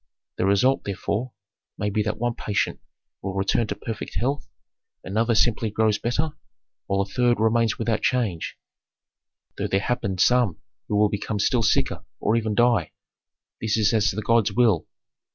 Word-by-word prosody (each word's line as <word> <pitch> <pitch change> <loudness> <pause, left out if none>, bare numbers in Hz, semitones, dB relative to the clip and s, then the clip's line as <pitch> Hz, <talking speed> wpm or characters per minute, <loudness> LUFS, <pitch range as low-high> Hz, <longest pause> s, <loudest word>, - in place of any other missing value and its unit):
The 95 - +1
result, 125 +7 +3
therefore, 105 +5 -3 0.5
may 105 0 -1
be 105 - +1
that 105 0 -2
one 120 +1 -1
patient 105 -3 -1 0.4
will 95 0 -4
return 100 +3 +1
to - - -3
perfect 115 -2 -6
health, 140 +4 -1 0.5
another 115 +4 +1
simply 110 0 +2
grows 110 0 +1
better, 150 +7 0 0.6
while 100 0 +1
a - - 0
third 120 +4 +1
remains 110 0 +2
without 115 -1 0
change, 110 -10 -1 1.0
though - - 0
there 95 - +1
happen 100 -3 -2
some 120 -3 +3 0.3
who 105 0 +3
become 105 +1 -2
still 115 +4 +2
sicker, 110 - +1 0.2
or 110 - +1
even 110 -2 0
die 120 -8 +2 0.7
This 110 -1 0
is 110 0 +3
as 110 -2 +3
the 110 +3 -3
gods 115 -3 +3
will!" 110 -6 +2
110 Hz, 155 wpm, -24 LUFS, 100-120 Hz, 1.0 s, result